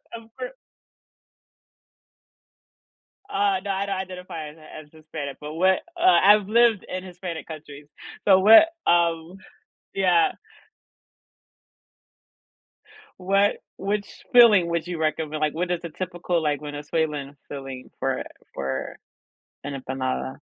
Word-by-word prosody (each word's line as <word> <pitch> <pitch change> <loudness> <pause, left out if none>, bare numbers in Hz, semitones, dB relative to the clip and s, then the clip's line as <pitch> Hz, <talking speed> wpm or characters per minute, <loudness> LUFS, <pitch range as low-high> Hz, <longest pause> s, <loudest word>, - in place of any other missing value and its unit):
Of 225 0 -11
cour - - -4 2.8
Uh, 195 -1 +1
no, 200 - -2
I 195 +1 -1
don't 195 -1 -2
identify 180 -4 -6
as 155 - -15
Hi 155 0 -11
as 150 - -18
Hispanic, 150 -3 -7
but 150 +1 -7
what 185 +3 +3 0.2
uh, - - -2
I've 210 - +6
lived 230 -2 +3
in 185 0 -5
Hispanic 175 -3 -7
countries, 150 -2 -10 0.4
so 190 -2 +7
what 225 +12 +8 0.2
um, 170 +1 +2 0.6
yeah. 180 -3 +3 2.9
What 195 +2 +2 0.2
which 200 +1 -4
filling 220 -8 +7
would 170 0 -2
you 175 -1 -4
recommend, 155 -1 -2
like, 150 -1 +1
what 175 +2 -2
is 175 -1 -2
a 170 - -5
typical, 175 0 -2
like, 150 -2 -1
Venezuelan 145 -1 -3
filling 135 -2 -8
for 135 -1 -1 0.3
for 65 -1 -4 0.7
an 140 -1 -5
empanada? 130 0 -3
170 Hz, 120 wpm, -24 LUFS, 150-195 Hz, 2.9 s, what